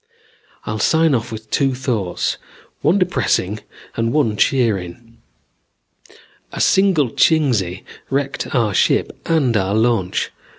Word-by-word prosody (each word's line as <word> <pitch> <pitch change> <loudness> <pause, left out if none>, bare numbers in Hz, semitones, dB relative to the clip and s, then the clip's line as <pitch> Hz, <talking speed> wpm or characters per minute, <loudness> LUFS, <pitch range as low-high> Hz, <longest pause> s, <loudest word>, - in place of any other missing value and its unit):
"I'll 110 0 -3
sign 160 +7 +3
off 120 -1 -2
with 110 0 -9
two 135 -2 +1
thoughts, 115 -9 -2 0.4
one 165 +6 +3
depressing 170 - 0 0.4
and 115 0 -1
one 125 -7 +1
cheering. 115 -1 -1 1.3
A - - -7
single 185 - +3
Chingsi 115 - +1 0.3
wrecked 140 0 -2
our 115 -5 +1
ship - - +2 0.2
and 140 -8 +2
our 100 0 0
launch. 110 -5 0
120 Hz, 115 wpm, -19 LUFS, 105-145 Hz, 1.3 s, sign